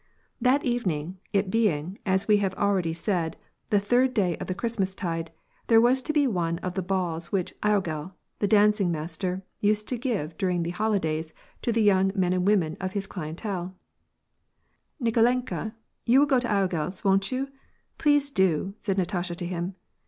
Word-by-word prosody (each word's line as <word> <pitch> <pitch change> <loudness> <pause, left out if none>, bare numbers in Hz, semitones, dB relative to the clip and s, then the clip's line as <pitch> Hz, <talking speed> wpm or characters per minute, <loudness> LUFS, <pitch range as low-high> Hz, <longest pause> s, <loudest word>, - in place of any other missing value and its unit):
That 265 +3 +3
evening, 185 - -1
it 195 -2 +1
being, 190 -5 0
as 190 +1 +2
we 210 -1 +5
have 195 -2 -1
already 190 -5 +1
said, 170 -1 -2 0.3
the 205 - +4
third 245 +5 +2
day 185 -6 +2
of - - -6
the 185 - -2
Christmastide, 190 -6 -2 0.4
there 225 -1 +6
was 250 +3 +4
to 280 - -2
be 295 -2 +3
one 170 -8 0
of 180 - -2
the 190 - -1
balls 175 -3 -2
which 190 -3 -1
logel, 185 -5 0 0.3
the 205 - +1
dancing 210 -2 +4
master, 175 +4 -3 0.2
used 210 0 +1
to 250 - -2
give 215 - -2
during 180 -3 +1
the 170 - -2
holi 215 +3 +1
days 160 -2 -2 0.3
to 235 - 0
the 225 -1 +2
young 195 -2 +4
men 180 -2 +2
and 185 +1 0
women 175 -7 +2
of 185 0 -3
his 200 -1 -2
clientele, 180 +1 -5 1.2
"Nikolenla, 235 -1 +1 0.3
you 240 +3 +6
will 290 - +6
go 270 -3 +3
to 245 - -2
logel's, 190 -4 -1
won't 195 +1 +2
you? 260 +2 -1 0.5
Please 290 -2 +3
do!" 190 - +1
said 195 -2 -1
Natasha 175 -1 -1
to 175 0 -5
him. 175 +1 -3
195 Hz, 175 wpm, -26 LUFS, 175-220 Hz, 1.2 s, there